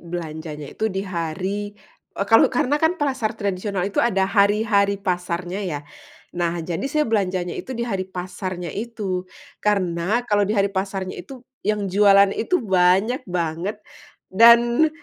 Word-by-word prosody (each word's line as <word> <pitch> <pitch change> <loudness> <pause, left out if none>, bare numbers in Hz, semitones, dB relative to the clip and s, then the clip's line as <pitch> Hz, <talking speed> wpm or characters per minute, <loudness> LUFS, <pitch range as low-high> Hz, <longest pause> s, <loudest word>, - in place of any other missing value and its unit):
belanjanya 160 -3 -7
itu 220 - -1
di 195 -1 -3
hari, 185 +3 -3 0.4
e - - 0
kalau 225 +3 +5
karena 265 +3 0
kan 320 +3 +2
pasar 265 -7 -1
tradisional 200 -2 -2
itu 200 - 0
ada 195 -5 +2
hari-hari 200 0 +2
pasarnya 180 -1 -3
ya, 155 -6 -3 0.5
nah, 175 -1 -1
jadi 165 -1 -3
saya 300 +2 +1
belanjanya 185 -5 0
itu 260 - -6
di 235 - -2
hari 195 -5 -2
pasarnya 180 -1 -5
itu. 205 -5 -4 0.4
Karena 195 +2 0
kalau 205 -3 +2
di - - +1
hari 200 0 +3
pasarnya 190 -1 -3
itu, 260 -3 -12 0.2
yang 210 -1 0
jualan 200 0 +5
itu 360 +11 +1
banyak 190 +5 +3
banget 175 +3 -2 0.6
dan, 235 +7 +6
195 Hz, 145 wpm, -22 LUFS, 180-220 Hz, 0.6 s, dan